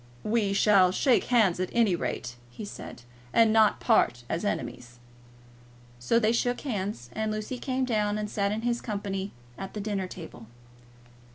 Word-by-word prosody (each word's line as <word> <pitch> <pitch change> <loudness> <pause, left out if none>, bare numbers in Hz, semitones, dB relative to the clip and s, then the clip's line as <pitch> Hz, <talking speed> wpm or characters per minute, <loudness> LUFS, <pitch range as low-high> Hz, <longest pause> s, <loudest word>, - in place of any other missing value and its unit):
"We 210 -3 +1
will 195 -4 +6
shake 255 +6 +3
hands, 215 -8 +3
at 185 - -1
any 225 -6 +3
rate," 125 -7 -4
he 205 - -8
said, 120 - -9 0.3
"and 225 -1 +4
not 220 -1 +4
part 120 - +2
as 165 - -2
enemies." 120 - -4 1.0
So 120 - +2
they 225 -1 +3
shook 245 +1 0
hands, 200 - -4
and 220 0 -1
Lucy 215 +4 -4
came 260 0 -1
down 210 -3 0
and 210 0 -2
sat 200 -1 -1
in 220 +2 -3
his 240 0 0
company 200 -2 -4 0.3
at 195 +1 -7
the - - -3
dinner 200 -2 -2
table. 160 -11 -10
210 Hz, 165 wpm, -28 LUFS, 185-225 Hz, 1.0 s, will